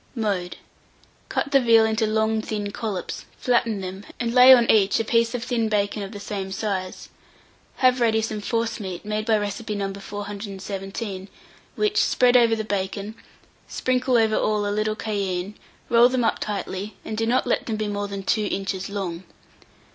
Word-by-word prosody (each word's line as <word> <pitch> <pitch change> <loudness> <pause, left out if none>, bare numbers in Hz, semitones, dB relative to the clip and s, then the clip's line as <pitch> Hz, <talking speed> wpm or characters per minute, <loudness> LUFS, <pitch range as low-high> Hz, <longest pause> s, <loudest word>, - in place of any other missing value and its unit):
Mode. 200 -6 -2 0.7
Cut 280 - -2
the 275 - +6
veal 230 -3 +5
into 220 0 +1
long 220 0 +1
thin 210 -2 -4
collops, 205 -4 -5
flatten 235 -4 +1
them, 190 +1 -6 0.2
and 235 -1 -1
lay 250 +1 +9
on 240 -3 +7
each 205 -2 +3
a 225 - -1
piece 230 +1 +2
of 235 - -3
thin 235 -3 0
bacon 205 0 0
of 195 0 -6
the 205 - -8
same 195 -1 -5
size; 190 -2 -4 0.7
have 255 -1 +3
ready 225 -1 +3
some 215 -1 -3
forcemeat, 215 -5 -3
made 215 +1 -2
by 220 -1 +4
recipe 210 +1 -3
No. 195 -1 -2
417, 195 -1 -6 0.5
which 420 0 0
spread 250 0 +3
over 235 -2 +5
the 220 - -3
bacon, 200 0 -3 0.5
sprinkle 255 -1 +1
over 220 -1 +3
all 210 -1 +1
a 205 - -1
little 215 0 0
cayenne, 200 -3 -3 0.3
roll 240 +1 +6
them 255 -1 0
up - - +1
tightly, 200 0 -4
and 220 - -4
do 225 +1 -1
not 250 +2 +2
let - - 0
them 225 - -1
be 215 0 -2
more 205 0 -2
than 200 -1 -6
2 215 +2 +1
inches 195 -1 -3
long. 190 -4 -4
215 Hz, 175 wpm, -24 LUFS, 200-230 Hz, 0.7 s, lay